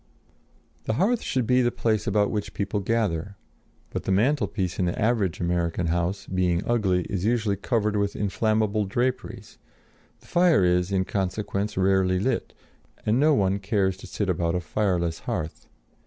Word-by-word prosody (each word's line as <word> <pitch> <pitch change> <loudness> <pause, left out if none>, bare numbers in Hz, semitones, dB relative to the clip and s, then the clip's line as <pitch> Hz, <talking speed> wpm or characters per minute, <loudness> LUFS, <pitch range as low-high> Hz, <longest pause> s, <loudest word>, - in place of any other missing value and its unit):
] - - -37
The - - +1
hearth 210 - +2
should 130 -3 -1
be 125 +3 +3
the 120 - +3
place 110 -3 0
about 105 0 +2
which 105 -2 -4
people 100 +1 -1
gather; 100 -3 -1 0.5
but - - -4
the - - 0
mantelpiece 100 - +1
in 90 - +2
the 85 - -2
average 110 -6 +1
American 85 0 0
house, 85 +3 -1
being 90 -2 0
ugly, 95 -7 +1
is 95 0 -3
usually 110 -2 +1
covered 105 0 0
with 100 -1 0
inflammable 110 +1 0
draperies; 120 +6 -3 0.6
the - - -23
fire 175 - +4
is, 90 +1 +2
in 95 -1 +1
consequence, 100 +1 -2
rarely 95 -1 +3
lit, 120 +8 -1 0.5
and 110 +4 +2
no 150 +1 +4
one 100 -3 +1
cares 95 -1 0
to - - -11
sit 105 - -3
about 85 -1 0
a - - +1
fireless 85 -1 -1
hearth. 80 +1 -4
100 Hz, 165 wpm, -25 LUFS, 90-110 Hz, 0.6 s, fire